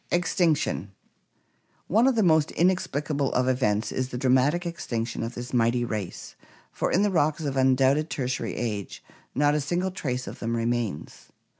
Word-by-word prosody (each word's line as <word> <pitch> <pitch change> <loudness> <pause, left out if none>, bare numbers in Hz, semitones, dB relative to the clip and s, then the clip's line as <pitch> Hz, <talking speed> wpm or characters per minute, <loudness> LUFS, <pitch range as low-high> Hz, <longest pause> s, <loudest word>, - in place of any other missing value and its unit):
Extinction* 165 - 0 0.5
— - - -41
One 235 +3 +5
of 265 - +3
the 220 - +3
most 160 -3 +4
inexplicable 150 -6 0
of 125 0 +1
events 115 -4 +1
is 130 0 -2
the 125 - -5
dra 130 0 +1
matic 145 +7 +3
extinction 120 -9 -3
of 115 +2 -4
this 120 +1 -7
mighty 120 0 +2
race, 105 -6 -5 0.4
for - - -2
in 190 - +3
the 205 - +2
rocks 155 -2 +1
of 140 -2 -2
undoubted 135 +3 +3
Tertiary 130 -2 -3
age 105 -6 -4 0.3
not 145 +2 +3
a 150 - +1
single 175 +6 -1
trace 125 -8 -3
of - - -8
them 115 0 -2
remains. 115 -8 -3
130 Hz, 170 wpm, -26 LUFS, 120-160 Hz, 0.5 s, One